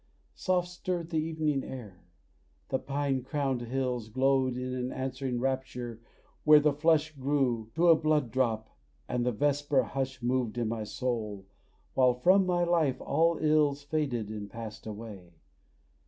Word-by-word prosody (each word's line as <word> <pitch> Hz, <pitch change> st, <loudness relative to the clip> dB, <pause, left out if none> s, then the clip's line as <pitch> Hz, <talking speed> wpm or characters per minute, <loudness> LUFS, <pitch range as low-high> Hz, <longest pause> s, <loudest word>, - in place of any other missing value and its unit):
Soft 180 Hz, -2 st, 0 dB
stirred 175 Hz, -1 st, -4 dB
the 160 Hz, -, +1 dB
evening 155 Hz, -3 st, -1 dB
air; 105 Hz, -9 st, -9 dB, 0.6 s
the 130 Hz, -, 0 dB
pine 140 Hz, -1 st, -1 dB
crowned 135 Hz, -2 st, -1 dB
hills 125 Hz, -2 st, -2 dB
Glowed 130 Hz, +1 st, +2 dB
in 125 Hz, 0 st, -3 dB
an 125 Hz, 0 st, -2 dB
answering 130 Hz, -1 st, -3 dB
rapture 125 Hz, -3 st, -3 dB, 0.4 s
where 150 Hz, 0 st, +8 dB
the 150 Hz, 0 st, +3 dB
flush 155 Hz, +1 st, +2 dB
Grew 130 Hz, -5 st, 0 dB
to 170 Hz, +2 st, +3 dB
a 165 Hz, -, +8 dB
blood 155 Hz, -6 st, +1 dB
drop, 115 Hz, -4 st, -1 dB, 0.3 s
and 125 Hz, -1 st, -1 dB
the 125 Hz, -, +1 dB
vesper 145 Hz, +2 st, +1 dB
hush 130 Hz, -2 st, -4 dB
Moved 125 Hz, -2 st, 0 dB
in 115 Hz, -2 st, 0 dB
my 110 Hz, -1 st, -3 dB
soul, 105 Hz, -5 st, -3 dB, 0.5 s
while 125 Hz, -2 st, +4 dB
from 185 Hz, +9 st, +4 dB
my 175 Hz, -1 st, +2 dB
life 165 Hz, -7 st, +2 dB
all 165 Hz, +3 st, +2 dB
ills 150 Hz, -2 st, +2 dB
Faded 140 Hz, -8 st, -1 dB
and 105 Hz, -2 st, -6 dB
passed 110 Hz, 0 st, -8 dB
away. 105 Hz, -5 st, -9 dB
130 Hz, 150 wpm, -30 LUFS, 120-150 Hz, 0.6 s, where